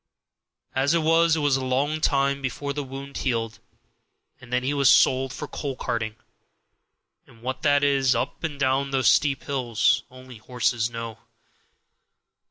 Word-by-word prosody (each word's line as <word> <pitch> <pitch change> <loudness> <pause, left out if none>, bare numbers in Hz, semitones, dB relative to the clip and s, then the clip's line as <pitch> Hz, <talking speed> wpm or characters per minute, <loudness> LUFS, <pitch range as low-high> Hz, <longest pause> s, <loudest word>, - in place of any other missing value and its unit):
As 140 +5 +2
it 165 - +1
was, 165 +1 +4
it 155 - -2
was 145 -2 +2
a 135 - -4
long 140 +4 0
time 140 -2 +1
before 140 +2 -3
the 145 0 -3
wound 135 +1 -8
healed, 115 -3 -2 0.8
and 125 -1 -15
then 125 0 0
he 135 +3 0
was 140 -2 +4
sold 130 0 +4
for 150 - -6
coal 140 -1 -5
carting; 115 -4 -3 1.1
and 115 0 -20
what 130 +1 -4
that 145 -1 +3
is, 135 -3 +3
up 115 - -3
and 150 -4 -4
down 135 +1 +1
those 135 -2 +3
steep 140 -3 +1
hills, 125 -2 +1
only 130 -2 -13
horses 120 0 -1
know. 115 -1 -7
135 Hz, 160 wpm, -24 LUFS, 125-140 Hz, 1.1 s, was